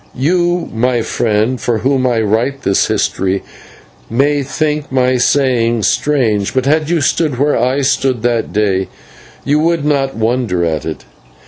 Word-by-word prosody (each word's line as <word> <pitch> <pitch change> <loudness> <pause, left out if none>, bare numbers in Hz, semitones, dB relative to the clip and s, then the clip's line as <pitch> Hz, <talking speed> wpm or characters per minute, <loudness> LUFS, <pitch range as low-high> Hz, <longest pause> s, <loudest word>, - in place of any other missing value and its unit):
You, 175 +5 0
my 120 +1 0
friend, 110 +3 0
for 120 -2 0
whom 130 +2 +1
I 120 -2 +1
write 120 +6 -1
this 100 - +2
history, 95 +1 -1 0.7
may 145 +5 +1
think 150 +1 -2
my 130 -1 +2
saying 120 -3 +1
strange, 115 -3 0
but 130 -1 +1
had 155 +2 +1
you 170 -3 +1
stood 150 -2 0
where 145 +3 +2
I 130 +4 +1
stood 130 -3 0
that 120 -2 0
day 100 -3 0 0.6
you 145 +2 +2
would 165 -1 0
not 135 -5 0
wonder 110 -6 0
at 80 -3 -2
it. - - -6
130 Hz, 150 wpm, -15 LUFS, 115-145 Hz, 0.7 s, this